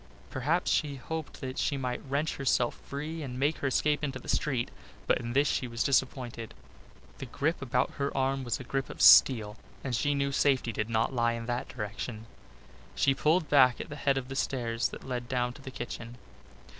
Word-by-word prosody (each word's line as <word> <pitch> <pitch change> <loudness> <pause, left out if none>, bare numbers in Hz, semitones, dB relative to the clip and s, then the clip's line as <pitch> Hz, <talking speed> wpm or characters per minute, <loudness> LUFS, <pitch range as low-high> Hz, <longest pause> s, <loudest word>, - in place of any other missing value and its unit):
Perhaps 155 +7 0
she 145 -3 +1
hoped 155 +4 -6
that 130 0 -4
she 140 - 0
might 125 -2 -3
wrench 145 +3 -1
herself 125 -3 +1
free 155 +3 -5
and 130 -4 -5
make 145 +4 +1
her 140 - -1
escape 150 +2 +1
into 135 -3 -2
the 130 - -13
street, 130 -5 0 0.3
but - - +2
in 120 0 -4
this 140 +2 +3
she 130 - 0
was 115 0 -2
disappointed. 125 - -1 0.6
The 135 - -6
grip 150 +7 -1
about 125 -2 0
her 140 - 0
arm 135 0 +1
was 120 -2 -2
a - - -6
grip 135 +1 -3
of - - -9
steel 110 -5 +7 0.3
and 130 -3 -1
she 145 +4 +1
knew 140 0 0
safety 135 -3 +2
did 110 +1 -3
not 115 +3 +1
lie 120 -1 +2
in 115 0 -5
that 120 +1 -2
direction. 110 0 -5 0.7
She 135 - +3
pulled 155 +4 +2
back 130 -4 +5
at - - -6
the 150 - -6
head 140 -2 +1
of 130 -1 -3
the 135 - -6
stairs 120 -3 -1
that - - -9
led 125 -1 -4
down 125 -2 0
to 145 - -14
the 135 - -7
kitchen. 120 -1 -7
130 Hz, 205 wpm, -29 LUFS, 120-140 Hz, 0.7 s, steel